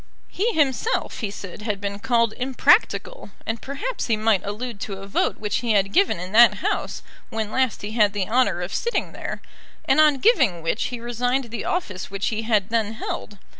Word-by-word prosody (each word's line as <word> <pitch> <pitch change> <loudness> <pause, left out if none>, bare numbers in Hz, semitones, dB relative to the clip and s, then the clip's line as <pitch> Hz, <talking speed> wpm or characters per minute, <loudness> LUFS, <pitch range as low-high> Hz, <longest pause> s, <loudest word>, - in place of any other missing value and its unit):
He 445 +5 0
himself, 300 - 0
he 215 - -2
said, 200 0 -8
had 210 -2 -2
been 200 0 -4
called 230 0 +2
impractical, 355 - +2 0.2
and 225 0 -3
perhaps 410 - -4
he 225 -3 +2
might 215 -2 +2
allude 210 +2 -5
to 195 -1 -5
a 195 - -8
vote 195 - 0
which 210 -2 -1
he 235 -2 0
had 195 -1 +2
given 385 - +3
in 180 +1 -6
that 235 +3 +7
House - - -2 0.3
when 220 -1 -3
last 260 -4 0
he 205 - -4
had 210 -3 +3
the 200 -3 -1
honour 220 -7 +2
of 175 - -5
sitting 475 - -1
there, - - -6 0.4
and - - +3
on 300 -2 +5
giving 260 - +3
which 165 +7 0
he 245 - -4
resigned 245 +1 -1
the 230 - -4
office 205 - -3
which 195 0 -2
he 220 -1 -2
had 215 -3 +1
then 225 -1 0
held. 210 -2 -5
225 Hz, 200 wpm, -23 LUFS, 205-255 Hz, 0.4 s, that